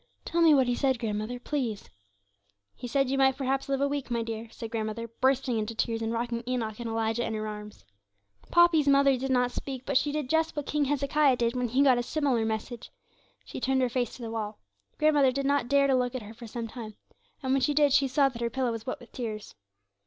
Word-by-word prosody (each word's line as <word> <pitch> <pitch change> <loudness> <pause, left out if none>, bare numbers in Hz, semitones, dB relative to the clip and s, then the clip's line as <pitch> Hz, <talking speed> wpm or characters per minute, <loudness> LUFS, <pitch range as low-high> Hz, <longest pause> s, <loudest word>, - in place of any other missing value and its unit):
'Tell 340 - 0
me 330 -1 +7
what 270 -3 +5
he 245 - 0
said, 265 +1 +1
grandmother, 220 +1 -3
please.' 245 -7 -3 0.9
'He 245 - -8
said 275 +2 +1
you 270 - 0
might 265 -1 +4
perhaps 270 0 -1
live 275 0 0
a 280 - +3
week, 280 -2 -3
my 235 -1 -1
dear,' 225 0 -6
said 225 0 -8
grandmother, 225 0 -3
bursting 255 +1 +1
into 215 +1 -4
tears, 225 0 -1
and 225 0 -1
rocking 235 0 -2
Enoch 230 -4 -2
and 235 -1 -4
Elijah 225 +1 -1
in 225 - -3
her 215 0 -3
arms. 210 - -9 0.6
Poppy's 345 -4 +5
mother 275 -1 +5
did 265 +2 -3
not 250 -1 +2
speak, 260 0 -6
but 280 - -2
she 290 - -2
did 300 -2 -2
just 320 +3 +1
what 295 -2 -3
king 295 0 0
Hezekiah 280 0 +2
did 235 0 0
when 250 -1 0
he 260 +4 +2
got 260 -3 +5
a - - -1
similar 265 -5 0
message, 220 +2 -4 0.6
she - - -7
turned 265 0 +2
her 250 - +1
face 245 -1 -2
to 245 - -10
the 225 - -5
wall. 215 -2 -4 0.4
Grandmother 295 -3 +4
did 275 +1 -2
not 280 -3 +1
dare 280 +1 +4
to 275 - +3
look 250 0 0
at 250 - -4
her 210 +2 -10
for 235 +1 -10
some 230 +1 -5
time, 220 -2 -8 0.5
and 260 - -1
when 270 - +2
she 290 +3 +1
did 290 -2 +4
she 275 -1 +4
saw 275 +2 +3
that 240 -2 -9
her 235 - 0
pillow 255 0 -1
was 225 0 -6
wet 255 - -3
with 245 - -15
tears. 220 -4 -6
250 Hz, 240 wpm, -28 LUFS, 230-275 Hz, 0.9 s, me